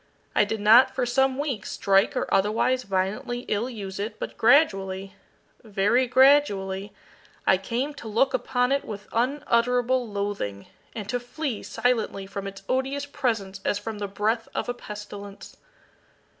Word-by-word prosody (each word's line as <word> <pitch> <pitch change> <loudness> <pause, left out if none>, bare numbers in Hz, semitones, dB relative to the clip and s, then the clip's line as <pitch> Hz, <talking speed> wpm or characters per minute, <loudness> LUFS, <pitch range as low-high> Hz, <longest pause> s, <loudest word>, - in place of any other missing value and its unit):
I - - +4
did 220 +1 -3
not, 230 +6 +7
for 255 - +1
some 265 +2 +2
weeks, 275 -8 -3
strike 195 0 +2
or - - 0
otherwise 220 +6 +2
violently 195 +4 -2
ill 230 +1 -2
use 200 -5 -7
it, 210 +3 -4
but - - -6
gradually 195 -8 +3 0.5
very 215 +4 +2
gradually 210 -8 +3 0.5
I 190 - +5
came 245 +9 -2
to 260 -5 -10
look 230 +5 +2
upon 250 0 0
it 280 0 +1
with 205 -2 -8
unutterable 245 -1 +1
loathing, 200 - -3 0.3
and 210 -3 -5
to 245 +2 0
flee 245 0 -4
silently 225 -5 -1
from 200 0 -6
its 195 0 -9
odious 270 +2 -1
presence 220 -9 -2
as 205 - +1
from 210 0 -6
the 205 - -2
breath 215 +3 -1
of - - -2
a 245 - -1
pestilence. 205 -3 -9
225 Hz, 150 wpm, -25 LUFS, 200-255 Hz, 0.5 s, not